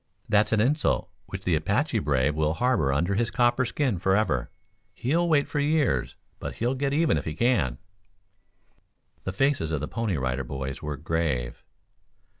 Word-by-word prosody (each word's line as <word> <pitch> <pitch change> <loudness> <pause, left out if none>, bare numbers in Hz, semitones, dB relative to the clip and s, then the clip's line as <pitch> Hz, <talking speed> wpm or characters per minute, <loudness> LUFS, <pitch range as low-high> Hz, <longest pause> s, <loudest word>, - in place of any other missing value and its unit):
That's 105 0 +3
an 110 - +3
insult 145 +8 +1 0.2
which - - -6
the - - +1
Apache - - +1
brave 70 0 +1
will 80 +1 0
harbor 120 - +2
under 85 +8 +1
his 115 +3 +1
copper 125 +1 +2
skin 125 - -1
forever. 95 - +1 0.5
He'll 170 +7 +1
wait 145 -3 +3
for 145 - -2
years, 145 - +1 0.2
but - - -5
he'll 120 +3 0
get 135 +1 -1
even 155 +2 +2
if - - -8
he 80 - -4
can." 85 - +1 1.5
The - - -1
faces 135 - +1
of 75 - 0
the 75 - -4
Pony 115 -7 -2
Rider 65 0 -1
Boys 65 +1 -5
were 75 -2 -4
grave. 75 -6 -2
95 Hz, 165 wpm, -26 LUFS, -, 1.5 s, That's